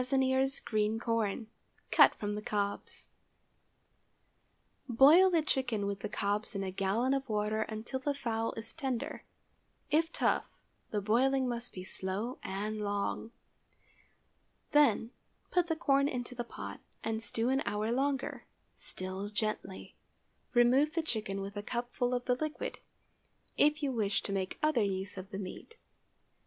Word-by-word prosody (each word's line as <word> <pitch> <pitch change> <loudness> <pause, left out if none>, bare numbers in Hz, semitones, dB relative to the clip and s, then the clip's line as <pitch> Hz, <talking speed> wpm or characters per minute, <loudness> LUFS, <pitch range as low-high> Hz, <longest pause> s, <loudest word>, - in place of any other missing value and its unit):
ears 265 +1 +2
green 215 0 0
corn—cut 225 -1 +2
from 205 0 -3
the 210 - -3
cobs. 205 -1 -2 1.8
Boil 295 +10 +8
the 335 -3 +3
chicken 245 -8 0
with 200 0 -2
the 210 - -4
cobs 205 +1 -1
in 195 - -1
a 190 - -3
gallon 200 +7 +1
of 270 -2 -2
water 215 0 0
until 220 +4 -3
the 285 +2 -1
fowl 230 -4 -1
is 225 0 -6
tender—if 295 +3 -3
tough, - - 0 0.3
the 210 - -1
boiling 260 +5 +3
must 240 0 -2
be 185 - -7
slow 195 +7 -3
and 210 +3 -3
long. 205 +2 -1 1.4
Then, 290 -5 +4 0.4
put 355 -1 +3
the 325 - +1
corn 280 -3 +3
into 250 -2 -3
the 240 -1 -3
pot, 235 - -7 0.2
and 220 0 -1
stew 225 +2 0
an 265 +1 +2
hour 215 +2 0
longer—still 235 -7 -3
gently. 215 -3 -3 0.6
Remove 260 +6 +5
the 330 - +1
chicken 215 -8 -2
with 200 +1 -6
a 205 - -3
cupful 245 +2 -1
of 245 0 -3
the 250 - +3
liquid, 310 +4 -3 0.8
if 300 +1 +3
you 275 - +1
wish 215 -5 0
to 200 - -3
make 190 -1 -2
other 305 -6 +3
use 195 0 -1
of 190 0 -7
the 195 - -5
meat. 200 - -7
230 Hz, 140 wpm, -32 LUFS, 205-265 Hz, 1.8 s, Boil